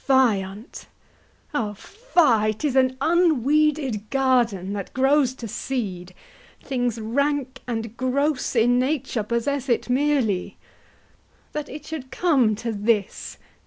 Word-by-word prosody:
Fie 270 - +3 0.3
on't! 195 +5 -10 0.7
Oh 215 -7 -2
fie! 290 - +1
'tis 270 +4 -2
an 260 -1 +3
unweeded 300 - +2
garden 240 -8 +1
That 200 -2 -6
grows 265 0 +3
to 235 - -7
seed; 190 -7 -4 0.4
things 245 -4 -2
rank 275 +4 -1
and 225 -2 -4
gross 265 +2 0
in 245 +2 +4
nature 265 -3 -1
Possess 245 +5 -2
it 240 +1 0
merely. 250 -9 +1 0.9
That 300 -1 -5
it 295 +2 -9
should 305 -5 -6
come 265 -12 +2
to 230 +2 -4
this! 210 -1 -1
255 Hz, 120 wpm, -23 LUFS, 220-285 Hz, 0.9 s, in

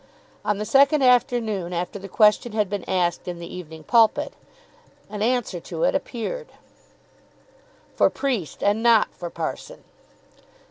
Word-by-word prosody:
On 210 - 0
the 210 - -3
second 275 +3 +4
afternoon 230 -7 +2
after 175 +3 -3
the 195 0 -9
question 210 +3 +3
had 210 -3 0
been 205 - -3
asked 175 -2 0
in 175 -1 -4
the 170 - -8
"Evening 160 -3 -9
Pulpit," 225 +4 +3 0.8
an 210 -1 -5
answer 235 -5 0
to 165 -1 -5
it - - +3
appeared, 285 - -4 1.5
"For - - +3
Priest 235 - -3
and 205 +2 +2
not 235 -2 +4
for 175 - -7
Parson." 165 -1 -6
210 Hz, 140 wpm, -23 LUFS, 180-240 Hz, 1.5 s, second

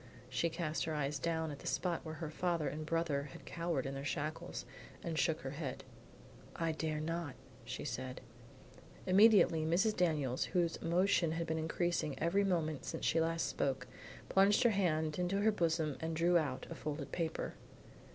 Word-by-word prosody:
She 150 +7 +1
cast 160 -2 -2
her 160 -1 -2
eye 140 -1 0
down 160 -1 0
at 145 - -7
the - - -8
spot 175 -2 0
where 160 -1 -6
her 155 -1 -5
father 170 -2 0
and 155 +1 -4
brother 155 -4 0
had - - -11
cowered 170 -5 -2
in 135 - -3
their 135 0 -5
shackles, 155 +4 -3 0.4
and 165 -1 -2
shook 160 0 +1
her 135 - -4
head. 140 -3 -5 0.7
"I 165 -1 0
dare 155 -1 -2
not," 165 -3 -3 0.3
said 130 0 -4
she. - - -8 0.8
Immediately 190 -4 +6
Mrs. 185 +7 +2
Daniels, 150 -8 +1
whose 170 -2 +1
emotion 170 -1 +2
had 165 0 -1
been 160 0 -1
increasing 160 -3 -1
every 175 +5 +2
moment 160 -6 0
since - - -4
she 165 - +3
last 165 0 +1
spoke, 135 -2 -1 0.4
plunged 200 +5 +5
her 240 - +5
hand 160 -5 +1
into 185 +3 +1
her 220 +1 +5
bosom 165 -7 0
and 160 +1 -2
drew 170 +2 +3
out 145 -6 +1
a - - -2
folded 145 -1 -5
paper. 165 -2 -2
160 Hz, 175 wpm, -35 LUFS, 150-175 Hz, 0.8 s, Immediately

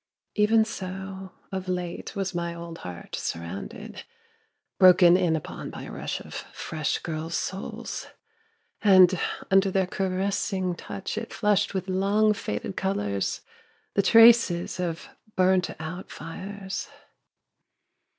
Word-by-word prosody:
Even 220 +1 +4
so 190 -2 -6 0.2
of 190 -1 -4
late 180 +2 -4
was 195 -1 -2
my 170 -1 -2
old 170 -1 -8
heart 90 -1 -7
surrounded, 85 +3 -6 0.8
broken 180 -2 +8
in 175 -3 +2
upon 155 - -5
by - - -8
a - - -8
rush - - -4
of - - -11
fresh 155 -2 -3
girls' 160 0 -4
souls... 190 +2 -5 0.7
and 185 -3 +6 0.3
under 195 0 +5
their 190 0 +2
caressing 190 0 -1
touch 195 +4 -5
it 230 - -8
flushed 205 -1 +1
with 190 0 -2
long 200 +3 +3
faded 185 - -4
colours, 105 - -1 0.5
the 200 - +3
traces 225 -5 +6
of 170 +4 -3 0.3
burnt 185 0 +3
out 165 +4 -6
fires 190 +5 -6
185 Hz, 120 wpm, -26 LUFS, 170-195 Hz, 0.8 s, broken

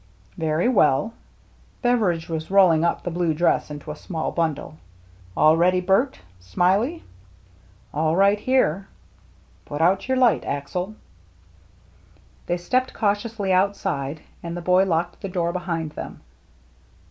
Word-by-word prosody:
" - - -31
Very 155 +7 +1
well." 200 - +3 0.7
Beveridge 210 -10 +1
was 160 -1 -4
rolling 185 -5 +5
up 170 - 0
the 175 - -3
blue 170 -2 0
dress 170 0 +1
into 150 +1 -7
a - - -6
small 160 +1 -4
bundle. 160 -2 -2 0.6
"All 155 +1 +6
ready, 180 +2 +3
Bert— 195 +9 +1 0.2
Smiley?" 190 - 0 0.9
"All 155 +2 +1
right 200 +2 +4
here." 200 -7 +1 0.4
" - - -32
Put 145 - -5
out 180 +7 +2
your 260 0 +1
light. 250 -3 +3
Axel." 180 +9 -4 1.5
They 175 - 0
stepped 255 +9 -1
cautiously 205 -2 0
outside, 160 -7 0 0.2
and 170 0 -5
the - - -5
boy 180 +2 +3
locked 170 -1 -1
the 195 - -4
door 170 -2 -1
behind 170 -4 -3
them. - - -8
175 Hz, 135 wpm, -23 LUFS, 160-200 Hz, 1.5 s, All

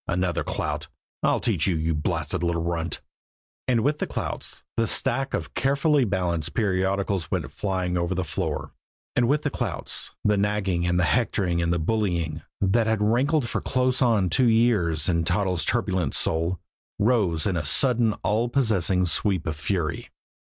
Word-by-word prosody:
Another 90 0 0
clout. - - -3 0.3
"I'll - - +2
teach 95 -9 +1
you, 90 - +2
you 80 +1 0
blasted 75 +2 -2
little 85 -1 0
runt!" 85 0 -2 0.7
And 120 -3 +3
with 150 +3 +1
the - - -1
clouts, - - -5
the 115 -1 +1
stack 135 +5 0
of - - -5
carefully 140 0 +2
balanced 90 -6 -1
periodicals 95 -2 0
went - - -2
flying 95 -3 -2
over 85 +2 -1
the 95 - 0
floor; 80 - -3 0.4
and 120 -1 +3
with 145 +3 +1
the 145 - -1
clouts, - - -2 0.2
the 105 -1 +3
nagging, 100 -4 0
and 90 0 +2
the - - +3
hectoring, 95 -5 +1
and 85 0 0
the 85 - +2
bullying, 85 -4 -1 0.2
that 110 +4 +2
had 110 -1 +1
rankled 130 +5 +2
for - - -2
close 130 0 0
on 110 -8 +3
two 125 -2 +4
years 105 -10 +3
in 85 -2 +2
Toddles' 90 -2 +1
turbulent 90 -7 0
soul, 85 +2 0 0.4
rose 100 -8 +2
in 100 -3 0
a 85 - -1
sudden 120 - +2
all 110 +6 +1
possessing 100 -8 +2
sweep 90 +1 0
of 80 -2 -2
fury. 80 +1 -2
95 Hz, 165 wpm, -25 LUFS, 85-115 Hz, 0.7 s, two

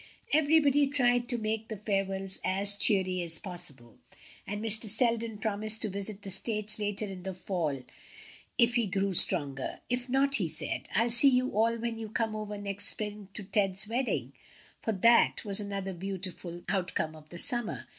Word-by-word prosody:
Everybody 290 -2 +3
tried 245 -3 +1
to 245 - +1
make 220 0 -3
the 215 - -6
farewells 195 -2 -1
as 200 +2 +5
cheery 190 -3 +1
as 165 -1 +2
possible, 160 - -6 0.5
and 205 +1 -4
Mr. 220 0 +1
Selden 230 0 +1
promised 215 +1 +1
to 215 - -2
visit 200 +1 -5
the 195 - -6
States 210 +2 +1
later 205 0 -1
in 190 -2 -8
the 190 0 -6
fall 165 -8 -3 0.7
if 235 0 +3
he 235 -3 +1
grew 195 +1 -1
stronger. 145 -7 +3
"If 250 +1 -2
not," 275 +2 +3
he 190 -6 -1
said, 155 -1 -4
"I'll 230 +3 +2
see 240 +4 +8
you 255 0 +1
all 230 +2 +1
when 230 0 -5
you 220 -1 -7
come 220 0 -2
over 210 -1 -6
next 205 0 -4
spring 210 -1 -3
to 210 - -6
Ted's 195 0 +2
wedding" 245 +4 -1 0.5
for 225 - -2
that 230 +4 +3
was 200 0 +2
another 200 -2 -5
beautiful 180 -1 -6
outcome 180 -4 -2
of 155 -1 -16
the 175 - -10
summer. 240 +5 +1
205 Hz, 175 wpm, -29 LUFS, 190-230 Hz, 0.7 s, see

